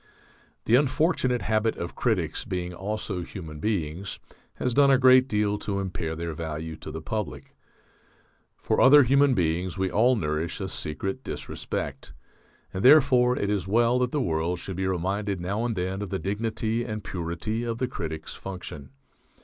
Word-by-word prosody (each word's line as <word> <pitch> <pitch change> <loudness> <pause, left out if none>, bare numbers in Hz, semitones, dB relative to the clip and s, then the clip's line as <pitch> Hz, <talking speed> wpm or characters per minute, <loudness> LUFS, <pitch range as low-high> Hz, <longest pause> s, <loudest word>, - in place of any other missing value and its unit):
The 110 - +1
unfortunate 130 -1 +2
habit 110 0 +1
of 85 - -5
critics 90 -10 -1
being 90 -6 -4
also 95 0 -3
human 80 -3 -8
beings 90 -2 -2 0.4
has 125 - -1
done 140 +2 +5
a 135 - +6
great 130 0 +6
deal 105 -3 0
to 100 -1 -2
impair 90 -4 -3
their 85 0 -4
value 80 0 -5
to - - -9
the 80 +1 -6
public. 105 +4 -4 1.0
For - - 0
other 145 +2 +8
human 140 +1 +4
beings 90 +2 0
we 95 -1 0
all 125 +4 +4
nourish 80 -3 -2
a 95 -1 -3
secret 95 - -4
disrespect. - - -5 0.6
And 95 - -3
therefore 130 -3 +6
it 100 - 0
is 100 -2 -1
well 120 +4 +3
that 125 -1 0
the 150 - 0
world 85 -2 0
should 95 +2 -6
be 95 0 0
reminded 95 +2 -1
now 100 +6 -2
and 115 -2 -1
then 95 +1 -2
of 100 - -4
the 95 - -1
dignity 110 +3 -2
and 110 -3 -5
purity 95 +6 -3
of 115 -1 -2
the 130 +1 -1
critic's 80 -9 -5
function. 75 -7 -8
100 Hz, 165 wpm, -26 LUFS, 85-120 Hz, 1.0 s, other